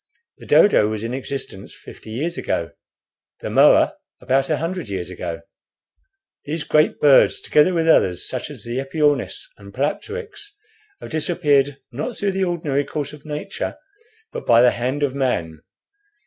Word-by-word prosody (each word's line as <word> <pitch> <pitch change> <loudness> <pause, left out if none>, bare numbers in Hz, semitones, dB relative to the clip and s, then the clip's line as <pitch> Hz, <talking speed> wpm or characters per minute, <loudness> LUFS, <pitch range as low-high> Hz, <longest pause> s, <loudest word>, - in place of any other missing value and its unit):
The - - -13
dodo 200 - +5
was 110 0 -4
in 115 +2 -3
existence 135 -7 -5
fifty - - -13
years 150 +10 -3
ago, 85 - -2 0.7
the - - -4
moa - - +5 0.2
about 135 +1 +1
a 155 - +1
hundred 170 - -4
years 95 -2 -4
ago. 85 -2 -6 1.0
These 150 +1 -3
great 155 0 +2
birds, 145 -2 +5
together 150 +5 +3
with 165 -1 +1
others, 90 - +3
such - - -4
as - - -9
the 120 +2 -3
epiornis 145 +2 0 0.2
and - - -12
palapteryx, 435 -2 -4 0.5
have - - -9
disappeared, 145 -4 +1
not 150 - -5
through 200 -1 0
the 190 0 0
ordinary 155 -5 -1
course 145 0 -5
of 150 0 -13
nature, 150 0 -5 0.5
but - - -7
by 115 +1 +6
the 125 - +6
hand 130 +5 -2
of 140 -2 0
man. 85 - -2
140 Hz, 155 wpm, -21 LUFS, 120-160 Hz, 1.0 s, by